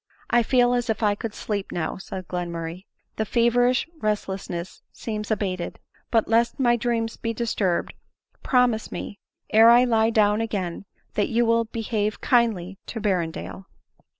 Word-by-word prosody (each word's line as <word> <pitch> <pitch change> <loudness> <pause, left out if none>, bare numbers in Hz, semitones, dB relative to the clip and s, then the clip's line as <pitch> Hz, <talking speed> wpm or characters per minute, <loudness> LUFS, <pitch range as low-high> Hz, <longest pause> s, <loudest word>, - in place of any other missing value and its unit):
" - - -31
I 240 - +5
feel 245 +1 +3
as 245 -1 -1
if 220 0 -1
I 205 -1 +4
could 215 +1 -6
sleep 205 -2 -3
now," 170 - -3
said 185 -1 -7
Glenmurray, 170 0 -5
" - - -47
the 220 - +1
fe 235 +2 +2
verish 245 +2 +3
resdessness 190 - -3
seems 215 -2 -5
abated; 190 -5 -2 0.3
but, 225 -2 +2
lest 235 +4 +2
my 240 -2 +4
dreams 230 -1 -1
be 230 0 -3
disturbed, 205 -7 -1 0.5
promise 250 -4 +2
me, 205 - -6 0.3
ere 225 +2 +7
I 240 +1 +7
lie 225 -2 +3
down 210 -1 +3
again, 200 -5 -3 0.3
that 205 - 0
you 235 +1 +2
will 230 0 +3
behave 215 -2 -2
kindly 215 -7 +1
to 230 - -5
Berrendale." 185 -2 -2
220 Hz, 160 wpm, -24 LUFS, 195-235 Hz, 0.5 s, ere